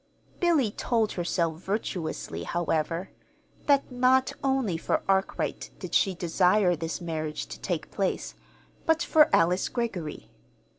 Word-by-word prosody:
Billy 320 - +3
told 225 -1 0
herself, 170 -2 -1
virtuously, 190 -5 -3
however, 170 +1 -1 0.6
that 280 -2 +3
not 255 +1 +3
only 265 -9 +1
for 165 - -1
Arkwright 195 0 0
did - - -8
she 195 -3 +3
desire 180 +2 +3
this 165 +2 -4
marriage 155 - -3
to 65 +1 -9
take - - -3
place, - - -2 0.5
but 325 +1 +3
for 305 -1 +5
Alice 175 +3 +3
Greggory. 195 -11 -4
185 Hz, 120 wpm, -27 LUFS, 165-245 Hz, 0.6 s, for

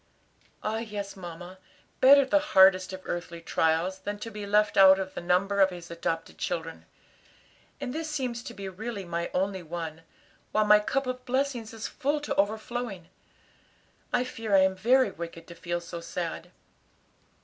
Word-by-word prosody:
"Ah, 220 +1 -1
yes, 205 -3 -5
mamma; 175 0 -9 0.4
better 275 +1 +8
the 295 +3 +3
hardest 190 -9 +5
of 185 0 -8
earthly 175 -1 -4
trials, 165 +3 0
than 205 +2 -4
to 225 +2 -7
be 210 -1 -6
left 210 +1 +3
out 190 -1 +8
of 190 -1 -4
the - - -5
number 190 +3 +2
of 190 - +6
his 175 -2 -9
adopted 165 -1 -3
children. 165 -2 -4 0.9
And 265 -3 -4
this 320 0 -3
seems 255 -5 -3
to 235 - -8
be 195 -1 -6
really 200 +1 -6
my 170 0 -3
only 190 +1 -1
one, 165 -1 -6 0.5
while 215 0 +3
my 210 0 +7
cup 270 +6 -1
of 255 0 -4
blessings 260 -3 -1
is 225 -1 -5
full 290 +3 -1
to 290 - -2
overflowing. 215 -2 -2 1.0
I 245 - +2
fear 225 -4 -1
I 190 - +7
am 190 0 +2
very 240 +3 +3
wicked 170 -1 -8
to - - -8
feel 175 0 -3
so 170 0 -8
sad." 170 0 -5
195 Hz, 170 wpm, -28 LUFS, 175-230 Hz, 1.0 s, better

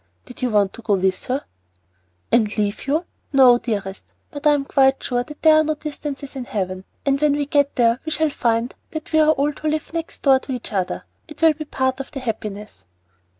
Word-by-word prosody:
"Did 250 - -12
you 250 - +1
want 205 -3 +2
to - - -11
go 215 -2 +2
with 190 0 0
her?" 260 +3 -2 0.9
"And 220 -2 +2
leave 205 +4 -1
you? 310 +5 +1 0.3
No, 255 -3 +7
dearest. 200 -5 -4 0.3
But 290 +1 -2
I 295 - +6
am 280 -1 0
quite 270 -1 +3
sure 245 -1 0
that 300 +3 -12
there 315 -1 +7
are 310 - +5
no 310 0 -1
distances 290 -2 -6
in 260 -2 -5
Heaven, 185 -4 -3 0.2
and 275 0 +1
when 300 -1 +4
we 290 0 0
get 285 -1 +1
there 235 0 +3
we 315 - -4
shall 315 -1 +1
find 235 -2 0 0.2
that 315 0 -7
we 315 - +5
all 310 -2 +3
are 295 - -2
to 310 - -5
live 310 +1 -2
next 330 -1 -5
door 270 -2 +5
to 265 - -6
each 245 -3 -6
other. 185 -3 -2 0.2
It 305 -2 -12
will 320 -1 +7
be 310 +1 -7
part 260 -2 -1
of 275 - -6
the 275 - -6
happiness." 210 - -6
270 Hz, 225 wpm, -21 LUFS, 225-300 Hz, 0.9 s, No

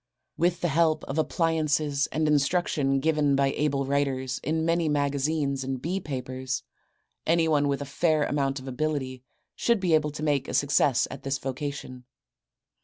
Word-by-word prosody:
With 175 +2 +1
the 175 - +1
help 160 +1 +2
of 140 +4 -3
appliances 155 -3 +1
and 155 0 -1
the 150 - +2
instruction 145 -2 +1
given 150 -2 +2
by 135 0 +2
able 140 -2 0
writers 130 -2 -1
in 160 +2 0
many 165 -1 +1
magazines 140 -1 0
and 130 0 -3
bee 175 +8 -2
papers 130 -4 -4 0.6
anyone 160 -3 +3
with 140 0 -1
a - - -7
fair 155 +2 +1
amount 140 -2 0
of 130 - -11
ability 130 -1 -2 0.3
should 235 -2 +2
be 180 -3 +1
able 155 -1 +3
to 150 - -6
make 145 -3 +1
a - - -3
success 140 -2 +3
at 135 - -8
this 135 0 -1
vocation. 135 -1 -5
145 Hz, 165 wpm, -27 LUFS, 135-155 Hz, 0.6 s, anyone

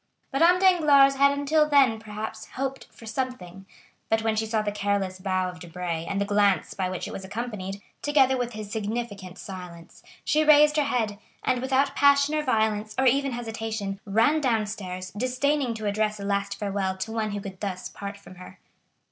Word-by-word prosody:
Madame 335 +6 +5
Danglars 305 -7 +5
had 280 +1 +5
until 300 +2 +2
then, 265 -6 +4
perhaps, 215 0 -7
hoped 270 0 -4
for 230 - -14
something; 215 -6 -5 0.4
but 225 0 +1
when 225 -1 +1
she 220 0 -1
saw 215 -1 0
the 205 - -1
careless 200 -2 -1
bow 185 -1 0
of 180 0 -8
Debray, 170 -1 -4
and 200 - -2
the 200 - +1
glance 205 -1 +2
by 185 -2 -2
which 185 -1 -4
it - - -7
was 195 - -6
accompanied, 200 -2 -5 0.2
together 275 -3 +3
with 245 -1 -3
his 215 -1 -7
significant 205 -4 -4
silence, 180 -4 -10 0.2
she 310 +1 +3
raised 300 0 +6
her 300 -2 +2
head, 220 -6 -1 0.2
and 250 -1 +1
without 265 +1 +1
passion 280 +1 +4
or 305 - +1
violence 220 -5 0
or 265 - +2
even 275 +1 +3
hesitation, 220 -4 -4
ran 230 +10 +3
downstairs, 210 -7 -2
disdaining 255 +2 0
to 215 -1 -6
address 210 +1 0
a 200 - -5
last 200 0 -1
farewell 195 -2 -2
to 205 +4 -4
one 220 -1 -1
who 205 0 -3
could 195 -2 -8
thus 190 -3 -4
part 200 0 -7
from 185 -2 -15
her. 180 - -12
220 Hz, 185 wpm, -26 LUFS, 200-265 Hz, 0.4 s, raised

